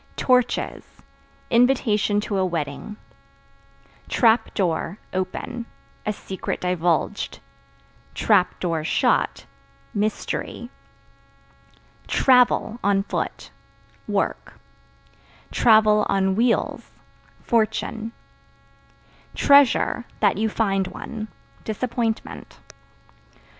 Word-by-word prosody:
Torches 250 -2 +1 0.7
Invitation 230 -4 +3
to 205 -2 -2
a - - +2
wedding. 170 +3 -4 1.1
Trap 225 -1 +3
Door 175 0 -1 0.2
(Open) 230 +6 -4 0.4
a - - +2
secret 195 -2 -5
divulged; 180 +2 0 0.8
(shut) 180 -5 +1 0.5
mystery. 215 +3 -3 1.4
Travel 250 -3 +3
(On 195 -1 +2
foot) - - -4 0.6
work; - - -2 1.1
(on 210 -3 +4
wheels) 235 +3 0 0.5
fortune. 225 0 -1 1.2
Treasure 280 -3 +4
(That 205 -2 +3
you 220 0 +1
find 195 -3 0
one) 220 +3 -7 0.4
disappointment. 225 0 -3
215 Hz, 65 wpm, -23 LUFS, 195-235 Hz, 1.4 s, on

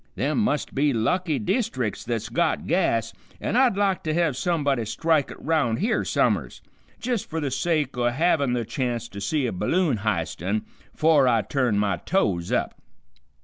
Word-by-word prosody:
Them 150 - 0
must 180 -9 0
be 140 +1 +2
lucky 155 +8 0
deestric's 125 - -1
that's 115 -2 -3
got 170 +6 0
gas, 115 - +1 0.3
an' - - -2
I'd 250 -5 +4
like 195 -2 +1
to 155 0 0
hev 165 -6 +1
somebody 145 -5 0
strike 155 +6 +1
it - - -9
'round 145 -8 +1
here 230 +4 0
some'rs, - - 0 0.4
jist 240 -3 -2
fer 160 - -2
the 145 -3 -2
sake 150 0 0
o' 120 -1 +1
havin' 140 -1 +1
the 120 -2 -1
chance 120 0 -2
to 100 -2 -8
see 145 +7 0
a 120 - -1
balloon 160 - +1
h'istin' 100 0 -2 0.3
'fore 155 -4 +4
I 115 -3 +3
turn 120 -1 0
my 100 -3 +1
toes 90 - 0
up. - - -1
140 Hz, 170 wpm, -24 LUFS, 115-165 Hz, 0.4 s, I'd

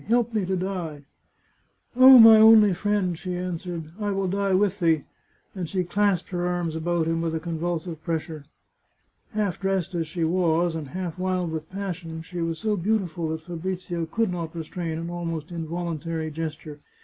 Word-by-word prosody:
Help 235 +1 +2
me 215 -3 +1
to 190 - 0
die! 175 -6 -4 0.3
" - - -41
" - - -42
Oh, 260 +1 +10
my 225 -1 +10
only 215 -2 +7
friend," 195 -1 0
she 180 +2 -5
answered, 175 -2 -5
" - - -19
I 205 -1 -1
will 195 -1 -1
die 195 0 +1
with 200 +1 +1
thee! 165 -4 +2 0.3
" - - -40
and 180 -4 -4
she 185 -2 0
clasped 195 0 0
her 175 -1 -2
arms 175 -2 -2
about 170 0 0
him 165 0 0
with 165 -1 -1
a - - -1
convulsive 165 0 -4
pressure. 160 -3 -4 0.9
Half 205 -5 -1
dressed 190 -2 -1
as 165 -2 -2
she 165 +2 -3
was, 170 0 +2
and 160 -3 -5
half 180 +2 -5
wild 185 -2 -1
with 160 -1 -5
passion, 180 -4 -5
she 175 0 -6
was 165 -1 -2
so 215 +5 0
beautiful 180 -4 -1
that 160 0 -3
Fabrizio 175 0 -4
could 225 +4 0
not 170 -2 -5
restrain 165 0 -4
an 170 +1 -5
almost 165 -2 -4
involuntary 165 -1 -4
gesture. 155 -1 -6
175 Hz, 185 wpm, -25 LUFS, 165-190 Hz, 0.9 s, Oh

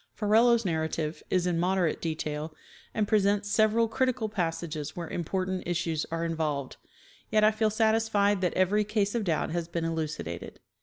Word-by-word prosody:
Ferrelo's 225 +2 +4
narrative 160 -2 -2
is 180 -1 +1
in 175 -2 0
moderate 180 -2 +1
detail, 155 -1 -3 0.4
and 210 -2 0
presents 205 -1 +2
several 220 +2 +3
critical 245 -1 0
passages 165 -5 -3
where 170 -2 -5
important 185 +3 -2
issues 165 -2 -1
are 165 0 -2
involved, 155 -5 -2 0.5
yet 215 0 +3
I 215 - +6
feel 215 0 +1
satisfied 215 -2 +2
that 180 - 0
every 195 +3 +3
case 205 -1 0
of 235 -2 0
doubt 160 -3 0
has 170 0 -2
been 170 -1 -3
elucidated. 155 - -4
185 Hz, 155 wpm, -28 LUFS, 165-215 Hz, 0.5 s, I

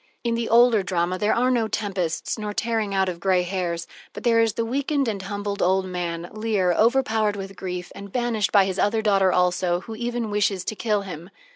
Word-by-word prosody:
In 235 -1 0
the 230 0 -2
older 235 -2 +5
drama 180 -1 -1
there 210 0 +2
are 250 +2 +2
no 235 -3 +1
tempests 195 -3 -2
nor 210 -1 -4
tearing 220 -2 -1
out 190 -1 +1
of 175 -2 -4
gray 185 0 +2
hairs, 175 -2 -3 0.3
but - - -8
there 230 -1 +4
is 225 -2 +3
the 230 +1 -1
weakened 275 +3 0
and 205 -3 -2
humbled 205 +1 -4
old 190 +1 +2
man, 175 -2 -4
Leir, 215 -4 +1
overpowered 220 -2 +2
with 195 0 -7
grief, 180 -1 -5
and 200 -1 -10
banished 240 -3 0
by 200 -2 +5
his 190 0 -3
other 220 +2 +1
daughter 195 -3 +3
also, 180 -1 +1
who 225 - -8
even 235 -1 -3
wishes 200 -3 0
to 215 - -3
kill 210 -2 0
him. 175 -2 -8
205 Hz, 210 wpm, -24 LUFS, 185-225 Hz, 0.3 s, older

